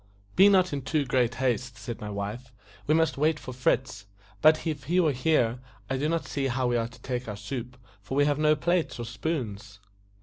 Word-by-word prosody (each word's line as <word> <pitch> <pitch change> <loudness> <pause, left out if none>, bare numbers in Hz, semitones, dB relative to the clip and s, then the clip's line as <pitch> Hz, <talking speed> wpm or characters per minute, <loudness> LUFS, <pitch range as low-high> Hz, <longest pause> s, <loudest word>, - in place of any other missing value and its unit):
"Be 195 +2 +7
not 185 -4 +4
in 140 - -2
too 145 +2 0
great 125 -2 +1
haste," 125 -2 -1
said 110 +1 -7
my 105 - -5
wife, 105 +5 -5 0.4
"we 155 - +4
must 160 -3 +1
wait 155 +1 +3
for 130 - -8
Fritz; 125 -4 -1 0.3
but 155 +1 +5
if 150 -4 -3
he 175 +6 +2
were 160 -4 +4
here, 125 -3 +1 0.3
I 135 - +1
do 150 +3 0
not 165 0 -1
see 140 -1 -2
how 130 0 -1
we 120 0 +1
are 115 -1 0
to 115 0 -16
take 125 -2 -3
our 105 -2 -5
soup, 125 +3 -6 0.2
for 135 - -5
we 145 +1 +4
have 145 0 +1
no 155 0 +4
plates 175 +2 0
nor 120 - -4
spoons." 110 -4 -4
130 Hz, 215 wpm, -27 LUFS, 120-155 Hz, 0.4 s, Be